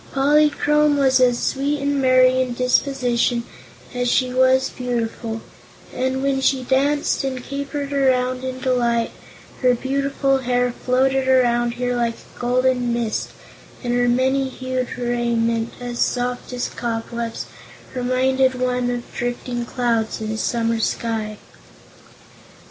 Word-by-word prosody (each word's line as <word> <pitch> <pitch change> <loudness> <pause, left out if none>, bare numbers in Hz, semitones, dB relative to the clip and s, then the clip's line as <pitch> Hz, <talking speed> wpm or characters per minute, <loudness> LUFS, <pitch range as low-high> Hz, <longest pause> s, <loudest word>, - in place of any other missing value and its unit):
Polychrome 295 +1 +3
was 265 -2 +4
as 245 -1 +4
sweet 285 +4 -1
and 280 0 0
merry 255 0 +5
in 250 -2 -2
disposition 250 -2 +1 0.5
as 245 -1 0
she 255 -1 +1
was 260 +1 +3
beautiful, 230 -2 -3 0.5
and 260 +1 -1
when 275 -1 +1
she 265 -1 +2
danced 280 +4 +1
and 260 -2 -3
capered 280 +1 -4
around 255 -2 +1
in 260 0 -4
delight, 240 -3 +1 0.5
her 250 -1 +4
beautiful 275 +1 0
hair 245 -1 +1
floated 260 +2 +1
around 240 -2 +3
her 245 0 -1
like 235 -1 0
a - - -18
golden 250 0 +1
mist 235 -2 -1 0.5
and 240 -1 -1
her 245 0 +2
many 265 +2 +2
hued 255 -1 -3
raiment, 235 -1 0
as 245 -1 -5
soft 245 0 -1
as 250 -1 -2
cobwebs, 230 0 -4 0.5
reminded 260 +1 +1
one 250 -1 0
of 245 -1 -2
drifting 240 0 -3
clouds 230 -3 -1
in 220 0 -3
a 220 - -3
summer 230 -1 0
sky. 220 -2 -2
250 Hz, 130 wpm, -21 LUFS, 240-265 Hz, 0.5 s, merry